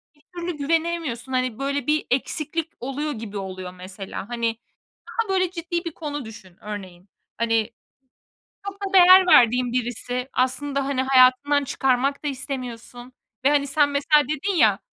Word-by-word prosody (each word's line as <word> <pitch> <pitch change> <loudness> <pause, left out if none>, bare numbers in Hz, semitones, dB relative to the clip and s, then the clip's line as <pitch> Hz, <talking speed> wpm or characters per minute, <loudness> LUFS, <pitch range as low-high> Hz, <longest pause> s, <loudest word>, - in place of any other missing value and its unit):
bir 290 - -28
türlü 345 -2 -4
güvenemiyorsun. 315 -5 -2
Hani, 255 -2 -1
böyle, 280 -1 -2
bir 305 0 +1
eksiklik 310 +5 -2
oluyor 280 +4 -3
gibi 215 -4 -7
oluyor 185 -1 -6
mesela. 190 +2 -8
Hani, 230 -2 -1 0.5
daha, 455 -2 -2
böyle, 370 -2 +1
ciddi 345 0 -4
bir 335 - -5
konu 290 -4 -5
düşün 205 -5 -12
örneğin. 195 -3 -8 0.3
Hani, 225 0 +1 1.0
çok 400 - -4
da 395 -1 -4
değer 370 0 +8
verdiğin 245 -6 +5
birisi 250 +1 -3
aslında, 275 +2 0
hani, 270 -2 0
hayatından 265 +2 +4
çıkarmak 270 +2 0
da - - 0
istemiyorsun 250 -2 -7 0.3
ve, 280 - +5
hani, 290 -1 +2
sen 285 +1 +3
mesela 295 +1 +3
dedin 310 +7 -2
ya, 215 - +4
265 Hz, 150 wpm, -23 LUFS, 235-300 Hz, 1.0 s, değer